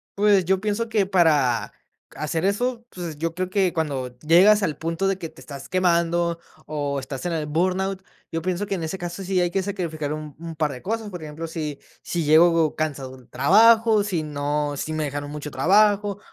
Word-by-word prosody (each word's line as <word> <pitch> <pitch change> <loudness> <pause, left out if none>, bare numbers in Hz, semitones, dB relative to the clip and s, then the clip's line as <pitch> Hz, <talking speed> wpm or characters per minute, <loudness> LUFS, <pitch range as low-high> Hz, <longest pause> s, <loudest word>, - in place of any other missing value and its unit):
Pues, 200 -2 +4
yo 190 +2 +2
pienso 215 +3 -2
que 210 -3 +2
para 155 -10 +2 0.4
hacer 160 +2 -2
eso, 235 +4 0
pues, 170 -7 -7
yo 165 +1 -2
creo 185 0 -2
que 190 -3 +2
cuando 135 -7 -3
llegas 190 +8 +5
al 160 -6 0
punto 165 +4 -2
de 195 -1 0
que 165 - -5
te 160 - -17
estás 140 -2 -10
quemando, 170 -2 +1 0.3
o 145 -2 -2
estás 135 +3 -7
en 175 - -2
el 155 -2 -2
burnout, 185 +5 -1 0.3
yo 165 -1 -2
pienso 185 +3 -2
que 200 - -4
en 180 - -4
ese 160 +4 -3
caso 175 +1 -6
sí 185 0 0
hay 175 -1 +1
que 195 - 0
sacrificar 165 -7 -3
un 155 -2 -7
un 165 -1 -7
par 155 -2 0
de 125 -2 -8
cosas, 220 +1 -3
por 180 -2 -7
ejemplo, 155 +1 -6
si 155 -3 -5 0.2
si 170 -1 -2
llego 160 +1 +4
cansado 140 -4 -3
de 130 - -16
un - - -27
trabajo, 220 - +5
si 180 -6 -2
no 145 0 -2
si 155 - -4
me 155 0 -1
dejaron 145 0 -4
mucho 150 0 -6
trabajo, 205 +6 +3
170 Hz, 205 wpm, -23 LUFS, 150-195 Hz, 0.4 s, llegas